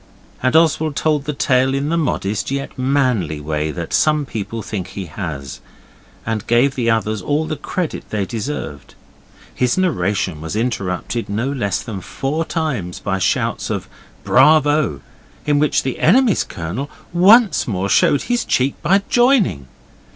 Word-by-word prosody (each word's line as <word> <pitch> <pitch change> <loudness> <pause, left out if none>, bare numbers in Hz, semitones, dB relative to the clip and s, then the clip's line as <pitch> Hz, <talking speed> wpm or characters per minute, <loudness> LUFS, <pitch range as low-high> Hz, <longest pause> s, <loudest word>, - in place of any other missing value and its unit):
And 130 +2 +1
Oswald 160 -2 +3
told 150 -2 0
the 150 - -2
tale 130 0 +2
in 140 +2 -1
the 165 - +1
modest 110 -10 -1
yet 140 0 -4
manly 130 - 0
way 75 +1 -2
that 85 +1 -5
some 150 -1 +2
people 115 -1 -5
think 95 -4 -4
he 95 0 -6
has, 75 -6 -6 0.7
and 110 -1 -3
gave 120 +4 +3
the 120 -3 0
others 110 -2 0
all 145 +10 0
the 155 - -3
credit 160 +3 -4
they 105 -2 -1
deserved. 110 - -6 0.6
His 125 +4 0
narration 95 - 0
was 80 +4 -5
interrupted 110 -1 -2
no 115 +7 -1
less 100 -8 -1
than 105 -5 -6
four 145 - -3
times 135 - -3
by 95 -2 -2
shouts - - 0
of - - -3 0.4
'Bravo!' 145 - +4 0.4
in 145 -1 +2
which 150 0 +2
the 130 - -3
enemy's 225 +5 +4
Colonel 100 - -5 0.2
once 200 +4 +5
more 100 -3 -1
showed 140 - +3
his 245 -1 0
cheek 130 +2 +1
by 195 +5 +3
joining. 240 - +2
125 Hz, 150 wpm, -19 LUFS, 100-150 Hz, 0.7 s, once